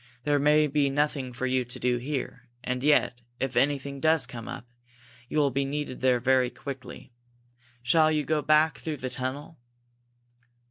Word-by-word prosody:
There 145 Hz, -1 st, +2 dB
may 150 Hz, +2 st, +4 dB
be 145 Hz, -1 st, +1 dB
nothing 140 Hz, -2 st, -1 dB
for 125 Hz, +1 st, -4 dB
you 130 Hz, 0 st, +1 dB
to 125 Hz, +1 st, -9 dB
do 125 Hz, -1 st, +1 dB
there, 125 Hz, -2 st, -5 dB
and 125 Hz, 0 st, -2 dB
yet, 135 Hz, -4 st, +2 dB, 0.2 s
if 135 Hz, -2 st, -2 dB
anything 140 Hz, +1 st, 0 dB
does 160 Hz, -1 st, +3 dB
come 115 Hz, -2 st, -9 dB
up, -, -, -7 dB, 0.6 s
you -, -, -3 dB
will 145 Hz, -2 st, +3 dB
be 140 Hz, +2 st, 0 dB
needed 140 Hz, -1 st, -4 dB
there 130 Hz, -1 st, +3 dB
very 130 Hz, 0 st, +2 dB
quickly. 135 Hz, -2 st, -9 dB, 0.7 s
Shall 155 Hz, +5 st, +4 dB
you 155 Hz, -1 st, +1 dB
go 155 Hz, +2 st, +1 dB
back 155 Hz, +1 st, +3 dB
through 155 Hz, -2 st, -4 dB
the 130 Hz, -1 st, -5 dB
tunnel?" 135 Hz, +5 st, -5 dB
135 Hz, 170 wpm, -27 LUFS, 125-150 Hz, 0.7 s, may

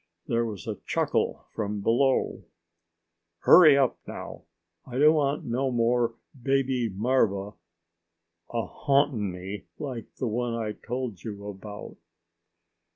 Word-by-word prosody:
There 115 Hz, 0 st, +1 dB
was 100 Hz, -7 st, -7 dB
a -, -, -4 dB
chuckle -, -, 0 dB
from 105 Hz, -2 st, -3 dB
below. 130 Hz, +5 st, +2 dB, 1.0 s
"Hurry 155 Hz, -6 st, +8 dB
up, 135 Hz, -3 st, +2 dB
now. -, -, -8 dB, 0.4 s
I 125 Hz, -1 st, -7 dB
don't 150 Hz, +3 st, +6 dB
want 145 Hz, -1 st, +1 dB
no 130 Hz, +3 st, 0 dB
more 120 Hz, -1 st, +1 dB, 0.3 s
baby 135 Hz, -3 st, +1 dB
marva 105 Hz, -2 st, +1 dB, 1.0 s
a 115 Hz, -1 st, -1 dB
haunting 135 Hz, -7 st, +1 dB
me 95 Hz, +3 st, -7 dB
like 125 Hz, -6 st, -6 dB
the -, -, -3 dB
one 120 Hz, +1 st, -1 dB
I 110 Hz, -2 st, -2 dB
told 120 Hz, -3 st, -5 dB
you 100 Hz, -3 st, -6 dB
about." 105 Hz, +1 st, -8 dB
120 Hz, 120 wpm, -27 LUFS, 105-135 Hz, 1.0 s, Hurry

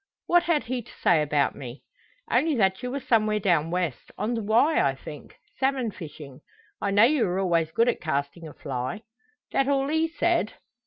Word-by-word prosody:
"What 350 Hz, 0 st, +4 dB
had 335 Hz, -4 st, +1 dB
he 250 Hz, +1 st, -3 dB
to 235 Hz, -, -16 dB
say 165 Hz, -3 st, +2 dB
about 145 Hz, -1 st, +1 dB
me?" 125 Hz, -1 st, -9 dB, 0.5 s
"Only 315 Hz, -1 st, +2 dB
that 190 Hz, -3 st, +1 dB
you 250 Hz, -, -3 dB
were 275 Hz, +3 st, -3 dB
somewhere 215 Hz, -4 st, +2 dB
down 170 Hz, -5 st, +2 dB
west 175 Hz, -6 st, -3 dB
on 215 Hz, +4 st, -1 dB
the 230 Hz, -, -2 dB
Wye 235 Hz, +9 st, +3 dB
I 135 Hz, -1 st, +1 dB
think 150 Hz, +2 st, -11 dB, 0.2 s
salmon 265 Hz, -4 st, 0 dB
fishing. 150 Hz, -7 st, -10 dB, 0.4 s
I 200 Hz, -, 0 dB
know 205 Hz, +2 st, +5 dB
you 265 Hz, +1 st, +4 dB
were 180 Hz, 0 st, -1 dB
always 170 Hz, -4 st, +1 dB
good 230 Hz, +8 st, +2 dB
at 245 Hz, -, 0 dB
casting 155 Hz, +1 st, -3 dB
a 150 Hz, -, -10 dB
fly." 130 Hz, -, -4 dB, 0.5 s
"That 270 Hz, 0 st, +1 dB
all 275 Hz, 0 st, +1 dB
he 320 Hz, +1 st, +1 dB
said?" 335 Hz, -6 st, 0 dB
210 Hz, 195 wpm, -26 LUFS, 160-265 Hz, 0.5 s, know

